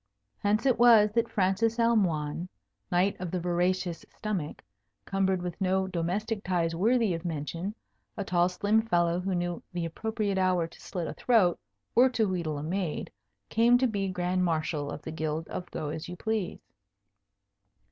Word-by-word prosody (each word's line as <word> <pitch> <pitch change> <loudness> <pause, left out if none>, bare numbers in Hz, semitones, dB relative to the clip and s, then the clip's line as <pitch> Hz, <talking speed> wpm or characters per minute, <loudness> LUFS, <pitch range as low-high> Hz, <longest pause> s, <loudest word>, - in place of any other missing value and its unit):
Hence 210 +4 +1
it 260 -4 +3
was 225 -3 +7
that 230 +1 +1
Francis 215 +4 +1
Almoign, 180 -8 +1 0.4
Knight 180 +3 +2
of 180 -1 -4
the 180 - -2
Voracious 175 0 0
Stomach, 195 -8 -4 0.4
cumbered 190 -2 0
with 180 +1 -5
no 190 0 +2
domestic 190 +5 -2
ties 170 -2 0
worthy 225 +2 +2
of 165 0 -4
mention, 170 +4 -4 0.4
a 200 - -1
tall 175 -1 +2
slim 205 +4 +2
fellow 175 -5 +1
who 185 0 -1
knew 175 -1 -2
the 175 -1 -2
appropriate 205 +3 -2
hour 185 -2 +2
to 165 - -14
slit 175 -3 -4
a - - -4
throat 210 -8 +3 0.3
or 255 +2 +6
to 225 -4 +1
wheedle 170 -5 -2
a 145 - -5
maid, 175 0 -2 0.4
came 235 +2 +5
to 260 - +2
be 200 -5 0
Grand 180 0 0
Marshal 155 -3 -1
of 145 - -7
the 160 - -5
Guild 160 0 -3
of 180 - -5
Go 150 - -4
as 160 +2 -5
you 180 - -5
Please. 220 -1 -2
185 Hz, 165 wpm, -29 LUFS, 170-210 Hz, 0.4 s, was